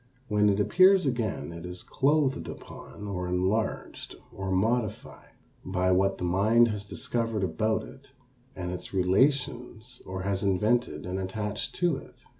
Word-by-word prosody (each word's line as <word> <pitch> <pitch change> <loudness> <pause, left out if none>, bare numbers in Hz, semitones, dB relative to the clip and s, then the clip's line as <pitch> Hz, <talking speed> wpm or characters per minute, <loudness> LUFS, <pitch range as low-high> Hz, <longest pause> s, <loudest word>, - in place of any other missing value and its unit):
When 105 0 +3
it 100 0 +1
appears 185 - +5
again 120 -9 -2
it 85 0 -8
is 90 0 -7
clothed 140 -1 +1
upon 105 - -9
or 90 -3 -3
enlarged 95 +5 -2 0.2
or 95 0 -5
modified 110 +4 -1 0.3
by 95 0 0
what 95 +1 +2
the - - -6
mind 110 +7 +4
has 105 -2 -4
discovered 115 -1 -2
about 110 +6 0
it 135 +1 -13 0.5
and 90 -1 -4
its 90 +2 -7
relations 120 +4 0
or 95 0 -4
has 100 -1 -1
invented 105 +5 +1
and 90 +1 -3
attached 105 +2 -3
to 175 -5 +1
it. - - -12
105 Hz, 145 wpm, -28 LUFS, 95-120 Hz, 0.5 s, appears